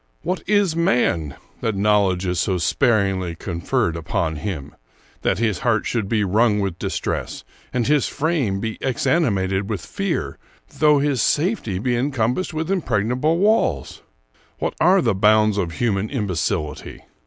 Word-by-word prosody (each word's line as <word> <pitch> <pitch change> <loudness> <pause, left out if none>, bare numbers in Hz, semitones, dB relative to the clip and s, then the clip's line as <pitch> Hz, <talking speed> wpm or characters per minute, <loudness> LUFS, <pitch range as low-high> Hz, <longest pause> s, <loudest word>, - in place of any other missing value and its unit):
What 180 +2 -2
is 205 -5 +3
man, 115 - +1 0.2
that 110 -2 -1
knowledge 100 -2 +2
is 90 -1 -1
so 95 +1 +1
sparingly 95 - +1
conferred 85 -1 -1
upon 80 -1 -2
him! 80 -3 -5 0.5
that - - +1
his 110 -3 0
heart 115 -5 +1
should 110 -5 -2
be 110 -2 +1
wrung 105 +2 +2
with 95 -4 -2
distress, - - -3 0.3
and 125 -2 0
his 150 -1 +2
frame 145 - -1
be 110 +1 -4
exanimated 100 - 0
with 105 -6 -4
fear, - - -3 0.4
though 150 -1 +5
his 140 -4 +1
safety 150 - 0
be 120 +5 0
encompassed 125 +5 0
with 160 +3 -3
impregnable 130 - 0
walls! 200 - +1 0.6
What - - -2
are 180 +1 +5
the 115 - +2
bounds 105 +1 +3
of 85 -4 -2
human 105 -1 -1
imbecility! 90 - -3
110 Hz, 140 wpm, -21 LUFS, 95-145 Hz, 0.6 s, though